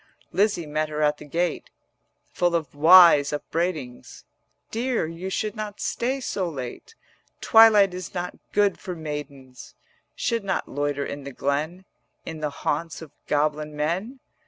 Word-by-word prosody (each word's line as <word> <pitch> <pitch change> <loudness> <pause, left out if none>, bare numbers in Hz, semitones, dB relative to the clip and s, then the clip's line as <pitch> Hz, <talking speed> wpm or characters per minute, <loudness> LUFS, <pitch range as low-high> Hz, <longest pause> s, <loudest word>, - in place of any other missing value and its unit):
140 190 +4 +3
Lizzie 200 -6 -1
met 155 +1 -2
her 150 0 -2
at 150 0 +2
the 150 - -11
gate 170 +3 -2 0.6
Full 175 -1 +1
of 155 -6 -2
wise 160 -1 +7
upbraidings: 150 -4 -4 0.5
'Dear, 240 -3 -1
you 165 +4 -6
should 215 +3 -2
not 210 -1 -6
stay 260 +3 -1
so 190 -8 -2
late, 140 - -8 0.4
Twilight 215 -4 +6
is 180 -1 -6
not 180 0 -4 0.2
good 205 -1 +2
for 180 - -6
maidens; 145 -5 -8 0.4
Should 230 -3 -1
not 190 -2 -2
loiter 145 0 -2
in 145 0 -6
the 140 - -7
glen 150 +8 -2 0.4
In 160 -1 -6
the 150 -1 -2
haunts 160 +3 -3
of 155 - -13 0.2
goblin 150 0 0
men. 180 - -2
165 Hz, 150 wpm, -24 LUFS, 150-190 Hz, 0.6 s, wise